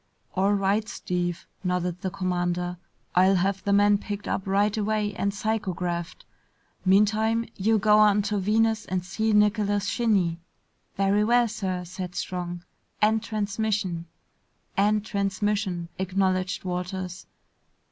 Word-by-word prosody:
"All 195 +2 +2
right, 200 +2 +1
Steve," 175 -1 -3 0.2
nodded 180 -1 -1
the 190 - -1
commander. 180 -2 -2 0.4
"I'll 185 +2 +5
have 190 +1 0
the 200 - 0
man 205 0 +5
picked 205 0 -6
up 195 - -2
right 200 +2 +2
away 210 -1 0
and 200 0 -1
psychographed. 185 -5 -3 0.6
Meantime, 215 +4 +3
you 220 +3 +2
go 210 0 +5
on 210 -1 +5
to 205 0 -1
Venus 220 +2 +2
and 185 -1 -2
see 220 +5 -1
Nicholas 210 -1 +2
Shinny." 200 -7 +1 0.6
"Very 195 +2 +3
well, 240 +2 +4
sir," 190 -5 -3
said 180 0 -6
Strong. 175 -1 -4 0.4
"End 220 +1 +3
transmission!" 205 -5 -2 0.7
"End 210 +1 +2
transmission," 200 -3 -1
acknowledged 185 -1 0
Walters. 180 0 -4
200 Hz, 125 wpm, -26 LUFS, 180-210 Hz, 0.7 s, I'll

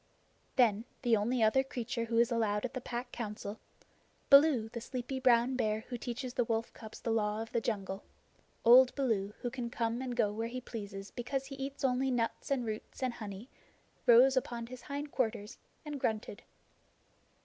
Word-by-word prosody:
Then 225 -3 +3 0.2
the 240 -2 +4
only 225 +3 +1
other 240 +5 +4
creature 245 -3 -3
who 230 0 -1
is 235 +1 +4
allowed 215 -2 +1
at 250 - -5
the 255 - -4
Pack 245 +1 -5
Council 210 -2 -5 0.7
Baloo, 275 -5 +7
the 235 +1 -7
sleepy 255 +2 -4
brown 250 0 +4
bear 215 -3 0
who 245 - -3
teaches 245 +1 -4
the 245 - +2
wolf 230 0 -2
cubs 220 -1 -10
the 230 - -2
Law 210 -1 +1
of 225 0 -5
the 235 - 0
Jungle: 195 -3 -3 0.6
old 250 +2 +8
Baloo, 215 -7 0
who 245 - -2
can 245 -2 -4
come 235 0 -1
and 250 -2 -3
go 210 -4 +2
where 225 +2 -2
he 250 +2 -5
pleases 200 -5 -7
because 265 +3 -3
he 275 0 -8
eats 275 +1 -5
only 265 0 +2
nuts 235 -3 -1
and 265 -4 0
roots 220 +4 -6
and 255 -2 0
honey 210 0 -7 0.6
rose 250 +3 +7
upon 240 -2 -1
his 250 +1 -9
hind 285 +3 -5
quarters 220 -4 -2 0.3
and 295 -2 -5
grunted. 215 -3 -2
235 Hz, 180 wpm, -32 LUFS, 220-255 Hz, 0.7 s, old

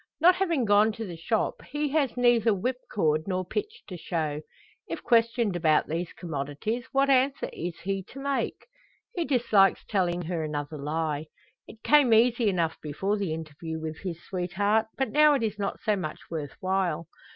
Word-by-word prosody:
Not 350 +4 +7
having 335 -10 +1
gone 210 +1 +5
to 225 +1 -5
the 175 -4 -7
shop, 210 +7 -1
he 295 +1 -2
has 275 -4 0
neither 240 -2 +4
whipcord 190 -8 -1
nor 185 -1 -1
pitch 425 - -4
to 185 - -7
show. 155 -3 -2 0.5
If - - -5
questioned 230 -3 +2
about 160 -3 +3
these 170 +3 -3
commodities, 165 - -4
what 275 0 +3
answer 270 +1 +2
is 170 0 -5
he 195 0 -2
to 275 - -11
make? 280 0 -2 0.5
He 345 -2 -1
dislikes 225 -7 +3
telling 180 -3 0
her 165 -1 -2
another 150 0 -4
lie. 155 +1 -2 0.4
It 225 - -14
came 285 -6 +5
easy 235 -1 +4
enough 170 -4 -1
before 190 +7 -1
the 200 -5 -2
interview 160 0 -5
with 155 0 -5
his 175 -4 -5
sweetheart, 200 +4 0
but 265 -4 -1
now 300 0 +6
it 260 - -1
is 210 -2 -2
not 200 -1 -2
so 215 -2 +1
much 165 -6 -4
worth 150 -4 -5
while. 185 -4 0
195 Hz, 175 wpm, -27 LUFS, 165-240 Hz, 0.5 s, Not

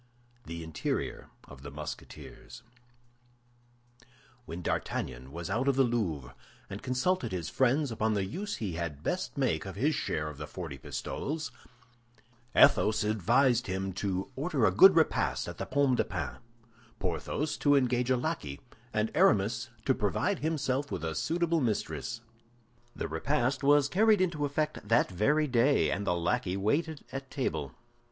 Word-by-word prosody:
THE 85 0 -6
INTERIOR 80 -1 -3
OF 70 -1 -13
THE 70 - -7
MUSKETEERS 75 - -9 1.8
When 85 +2 -6
D'Artagnan 65 -3 -3
was 85 +2 -5
out 120 +6 0
of 140 - +3
the 135 - +5
Louvre, 90 - -1 0.4
and 100 - -6
consulted 135 - 0
his 85 -4 -3
friends 135 +2 +2
upon 110 -1 0
the 100 -2 0
use 200 - -4
he 100 -6 -4
had 80 -3 -4
best - - -2
make - - +1
of - - -7
his - - +1
share 75 0 -2
of 75 -2 -8
the 75 - -5
forty 75 -4 -7
pistoles, 150 - -4 1.0
Athos 110 0 +5
advised 115 +4 +2
him 95 0 -2
to 95 +3 -2
order 140 -4 +1
a 95 - +4
good 185 - +8
repast 65 - +2
at - - -7
the - - -3
Pomme 140 -2 +2
de - - +2
Pin, - - -4 0.6
Porthos 150 +1 -2
to 145 -1 +4
engage 125 -2 +2
a 130 - +3
lackey, 120 - -3 0.3
and 110 0 0
Aramis 110 +5 +3 0.2
to - - +4
provide - - 0
himself 145 -2 -1
with - - -3
a 80 - -2
suitable 165 - 0
mistress. 115 0 -2 0.7
The - - -3
repast 130 - 0
was 145 0 +5
carried 210 +5 +4
into 170 -5 +1
effect 150 +2 -1
that 115 0 +2
very 145 - +2
day, 130 +2 +3
and 100 0 -2
the 90 - +2
lackey 90 +2 0
waited 145 +10 -1
at 135 0 -6
table. 80 - -2
120 Hz, 155 wpm, -30 LUFS, 90-145 Hz, 1.8 s, good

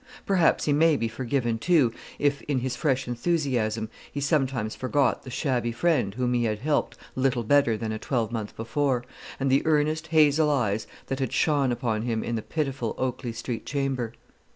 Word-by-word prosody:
Perhaps 185 -4 +3
he 145 - +2
may 160 +1 +4
be 115 - 0
forgiven, 120 0 -1
too, 145 -7 +3 0.2
if, 145 -1 +1
in 140 -4 0
his 130 0 -2
fresh 135 -2 0
enthusiasm, 120 -5 0 0.2
he 145 - -4
sometimes 135 -7 0
forgot 130 0 +1
the - - -10
shabby 125 -3 -1
friend 120 - +1
whom 125 0 0
he 120 -1 +2
had 110 -1 0
helped 145 +6 -1 0.2
little 130 -2 +1
better 120 -2 +3
than 110 0 -3
a 110 - -3
twelvemonth 115 -4 -2
before, 125 +2 0 0.4
and 135 -1 +1
the 135 - +4
earnest 155 +1 +1
hazel 155 -1 +4
eyes 110 -7 0 0.2
that 135 0 -3
had 130 -3 -1
shone 145 -4 +2
upon 115 -3 -1
him 115 -1 -1
in 120 - -3
the 115 - -1
pitiful 135 -4 -2
Oakley 125 -1 -2
Street 115 0 -5
chamber. 135 -5 -2
130 Hz, 175 wpm, -26 LUFS, 115-145 Hz, 0.4 s, may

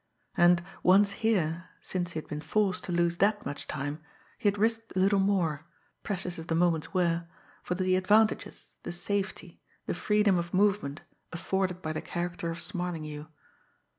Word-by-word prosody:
And, 175 0 +5 0.2
once 200 +2 +5
here, 185 -7 0
since 175 -2 -3
he - - -4
had - - -10
been 150 0 -5
forced 195 0 0
to 185 - -4
lose 170 0 +1
that 205 +2 +2
much 145 - -5
time, 145 +3 -4 0.4
he - - +1
had 200 - -3
risked 225 +2 0
a - - +1
little 195 +1 +4
more, 170 -6 +1 0.3
precious 180 -3 -4
as 165 - -8
the 165 - 0
moments 165 -2 +1
were, 170 -2 +1 0.3
for 180 - -2
the 185 0 +2
advantages, 210 +4 +2
the 175 - -5
safety, 200 +3 -3 0.2
the - - -1
freedom 210 -3 +2
of 170 +1 -3
movement, 190 -7 +1 0.3
afforded 185 +1 -2
by 155 -1 -2
the 155 - -3
character 175 -1 -3
of 165 +1 -1
Smarlinghue. 160 -6 -4
180 Hz, 165 wpm, -29 LUFS, 170-200 Hz, 0.4 s, And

